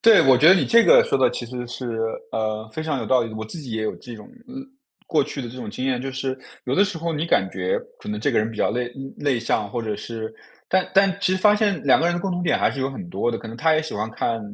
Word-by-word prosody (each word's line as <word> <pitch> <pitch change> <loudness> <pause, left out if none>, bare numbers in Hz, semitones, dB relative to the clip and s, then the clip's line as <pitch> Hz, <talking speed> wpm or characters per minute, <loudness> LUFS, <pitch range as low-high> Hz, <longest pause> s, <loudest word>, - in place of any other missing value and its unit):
对， 225 -3 +7
我 135 -1 +6
觉 150 +6 +6
得 190 - +9
你 185 - +2
这 230 0 +5
个 - - +7
说 - - +1
得 130 - +3
其 120 - -5
实 125 +1 -6
是， 120 +1 -6 0.4
呃， 110 0 -2
非 155 - -4
常 155 -3 -2
有 115 - -4
道 130 +2 +3
理 115 - -5
的。 110 - -8
我 110 - -5
自 135 +10 -7
己 135 -5 -9
也 110 0 -2
有 110 - -2
这 120 -2 -10
种 105 - -13 0.2
嗯， 250 - -11 0.5
过 155 -3 +2
去 140 - -5
的 120 - -6
这 120 - -10
种 120 -5 -6
经 130 +4 -4
验， 125 -2 0
就 135 - -4
是， 135 0 -3 0.3
有 130 - -1
的 200 - +5
时 190 -4 -4
候 165 +1 -2
你 155 +1 -2
感 170 - +2
觉 485 +2 -1 0.2
可 - - -9
能 210 0 -3
这 145 - 0
个 - - +3
人 110 +1 0
比 115 - -10
较 - - +1
内 120 0 -2 0.2
内 140 -4 0
向， 110 -3 -1
或 120 - -3
者 110 -2 -3
是 110 +1 -6 0.4
但 185 -1 +1
但 195 -1 +4
其 185 - +2
实 190 - +1
发 210 +2 +5
现 205 -5 +1
两 135 - +5
个 165 - +2
人 175 - +1
的 - - -2
共 190 +1 -2
同 175 0 -2
点 175 - +2
还 - - +3
是 135 - -5
有 135 +1 -1
很 175 +6 -8
多 120 - 0
的， 115 - -3
可 - - -9
能 115 +1 -8
他 160 +5 +3
也 155 - +1
喜 160 - -6
欢 110 +2 -3
看， 115 +1 -2
130 Hz, 340 characters per minute, -23 LUFS, 115-175 Hz, 0.5 s, 得